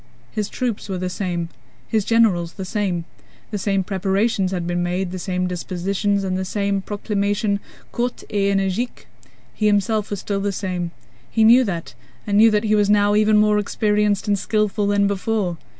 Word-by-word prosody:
His 210 -1 -2
troops 235 -5 -3
were 190 - -2
the 180 0 -3
same, 175 -3 -3 0.4
his 220 -2 +1
generals 195 -7 +2
the 190 - -6
same, 180 -4 -1 0.5
the 205 - -2
same 195 -1 0
preparations 195 +1 0
had 180 -3 -2
been 175 0 -1
made, 180 +1 -1
the 185 - -5
same 180 0 -1
dispositions, 190 +3 -1
and 185 -1 -1
the 190 - -1
same 200 +1 -1
proclamation 205 0 -1 0.3
courte 245 +1 -2
et 200 -1 +2
énergique, 195 +6 -2 0.5
he 215 - 0
himself 210 +1 +1
was 205 - -3
still 200 0 -2
the 200 0 0
same: 180 -3 -3 0.4
he 220 - +2
knew 240 +4 +7
that 170 - -4 0.3
and 205 0 +1
knew 225 +1 +8
that 210 0 +1
he 215 -1 +1
was 205 -1 +3
now 205 0 +4
even 215 0 +4
more 210 0 +4
experienced 210 -1 +1
and 205 -1 +2
skillful 210 0 0
than 205 0 +3
before. 200 -2 -1
200 Hz, 180 wpm, -21 LUFS, 185-210 Hz, 0.5 s, knew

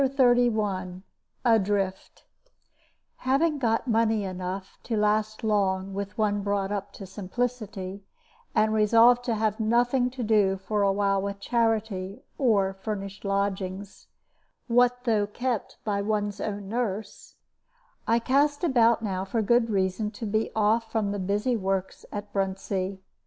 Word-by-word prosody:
CHAPTER 260 -2 +4
XXXI 205 -6 0 0.4
ADRIFT 200 -4 0 0.9
Having 285 +4 +1
got 230 -1 0
money 225 -2 +2
enough 185 0 -5
to 225 - -2
last 215 +1 +1
long 195 -3 +1
with 200 +1 -5
one 205 -2 +1
brought 200 -1 -1
up 200 -2 -3
to 195 - -9
simplicity, 200 0 -4 0.5
and 215 0 +3
resolved 230 +3 +5
to 235 - 0
have 215 0 0
nothing 245 +3 +2
to 250 -1 -5
do 205 -3 +3
for 205 +2 -2
a 200 -1 +3
while 195 0 +1
with 200 0 -4
charity 220 -2 -1 0.2
or 205 -8 +3
furnished 195 0 -6
lodgings 195 -1 -3 0.6
(what 245 +1 +3
though 215 -4 +2
kept 240 +1 -3
by 200 -2 -1
one's 205 -1 -1
own 205 -1 -4
nurse), 215 -2 -4 0.7
I 230 - +4
cast 285 +6 +1
about 235 -7 +3
now 190 -3 -2
for 220 +3 -1
good 235 +2 +3
reason 195 +1 0
to 230 - -5
be 215 +1 0
off 220 +1 +2
from 220 -2 0
all 200 - -1
the 205 - -3
busy 205 +6 0
works 195 -2 -2
at 205 0 -6
Bruntsea. 195 0 -2
210 Hz, 140 wpm, -26 LUFS, 195-230 Hz, 0.9 s, resolved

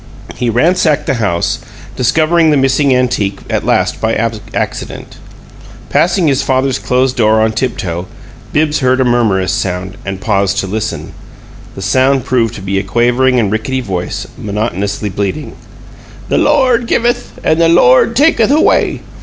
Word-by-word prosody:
He 125 - -2
ransacked 155 +5 +2
the - - 0
house, 85 -5 -1 0.4
discovering 160 +6 +2
the 150 - +3
missing 135 +1 +2
antique 125 -6 0
at - - -1
last - - 0
by 110 0 0
accident. 110 -2 -4 0.7
Passing 175 +1 +2
his 135 -2 +2
father's 130 0 0
closed 130 +1 0
door 110 -1 +3
on 110 0 +2
tiptoe, 95 -7 -3 0.4
Bibbs 150 0 +1
heard 130 -1 +2
a 130 - +2
murmurous 110 -6 +1
sound, 95 +1 -3
and 95 -1 -5
paused 100 0 0
to - - 0
listen. 105 +3 -4 0.6
The 95 - -7
sound 130 +6 +2
proved 120 -4 0
to 100 - -8
be 95 0 -1
a - - -3
quavering 125 +5 +2
and 105 -4 0
rickety 110 +5 -2
voice, 95 -6 -4
monotonously 100 -1 -3
bleating: 100 +10 -3 0.8
"The - - +2
Lo 295 0 +3
ord 240 -2 +1
givuth 240 +1 -1
and 160 +1 +2
the 165 - +4
Lo 170 -6 +5
ord 180 - +3
takuth 270 -5 +3
away! 300 +3 +2
125 Hz, 155 wpm, -13 LUFS, 100-145 Hz, 0.8 s, Lo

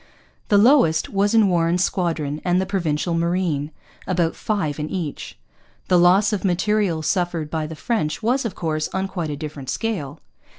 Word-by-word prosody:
The 205 - +4
lowest 205 - +4
was 205 +2 +1
in 220 -3 +5
Warren's 175 0 +2
squadron 160 -6 -1
and 180 0 +2
the 190 - 0
Provincial 170 -4 -1
Marine 165 -3 0 0.4
about 175 -3 0
five 160 -9 -2
in 150 +1 -3
each. 165 - -5 0.5
The 180 - +5
loss 190 +5 +4
of 205 - -2
material 190 -2 +1
suffered 170 -3 -1
by 155 -1 -2
the 160 - -7
French 160 -2 -2
was, 250 +4 +1
of 230 - -4
course, 155 -2 -2
on 190 0 -1
quite 175 -5 -4
a 145 - -4
different 145 -3 -7
scale. 205 - -3
175 Hz, 170 wpm, -22 LUFS, 155-200 Hz, 0.5 s, in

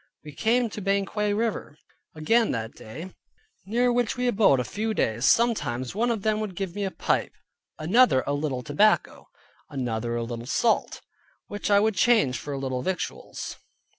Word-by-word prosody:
We 150 - -8
came 235 - +2
to 210 - -6
Banquang 200 +1 0
river 220 -9 -2 0.4
again 225 +9 +2
that 110 -1 -4
day, 160 +12 -9 0.5
near 240 +3 +2
which 245 -1 0
we 250 - -1
abode 200 - +4
a - - 0
few 220 - -3
days. 115 - 0
Sometimes 135 - +2
one 230 +5 0
of 225 -4 -1
them 215 -1 +1
would 210 -4 -4
give 190 -2 -4
me 205 - -3
a - - -1
pipe, - - -1 0.4
another 180 - +4
a 140 - -1
little 145 -3 -2
tobacco, 205 +11 +2 0.4
another 120 -4 -3
a 120 - -1
little 120 0 -6
salt: 225 - +1 0.4
which 205 0 -4
I 200 -1 +6
would 220 +1 +2
change 195 - +3
for 145 - -7
a 140 - -3
little 130 -2 -3
victuals. 185 +5 -4
195 Hz, 170 wpm, -26 LUFS, 130-220 Hz, 0.5 s, I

